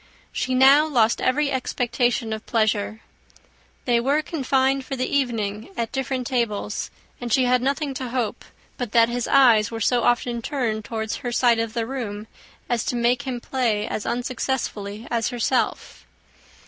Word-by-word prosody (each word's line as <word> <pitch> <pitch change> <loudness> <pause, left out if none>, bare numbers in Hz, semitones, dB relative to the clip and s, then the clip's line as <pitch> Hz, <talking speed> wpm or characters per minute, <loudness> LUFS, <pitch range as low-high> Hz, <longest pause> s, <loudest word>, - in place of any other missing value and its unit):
She 255 - -1
now 275 +4 +6
lost 235 -7 +2
every 280 +2 +1
expectation 245 -3 0
of 220 - -5
pleasure. 215 -1 0 0.8
They 240 -2 +3
were 280 +5 +1
confined 270 -3 +1
for 270 - -5
the 255 0 -1
evening 225 - -1
at 230 -1 -2
different 265 -1 -2
tables; 225 -4 -2 0.3
and 240 -1 -4
she 255 +3 +4
had 250 0 +3
nothing 280 +2 -1
to 260 -1 -5
hope, 240 -3 -2 0.4
but 245 -4 -4
that 230 -1 +5
his 245 0 -2
eyes 235 -6 +5
were 225 - -5
so 240 +3 +2
often 240 0 +1
turned 225 -5 -2
towards 220 -1 -3
her 245 - -4
side 240 -1 +3
of 230 0 -3
the 230 -1 0
room, 225 -5 -5 0.4
as 240 -2 0
to - - -1
make 245 +3 +1
him 250 -2 -2
play 235 -5 -1
as 210 - -4
unsuccessfully 235 -4 -3
as 230 -2 0
herself. 245 +2 -1
240 Hz, 160 wpm, -23 LUFS, 225-260 Hz, 0.8 s, now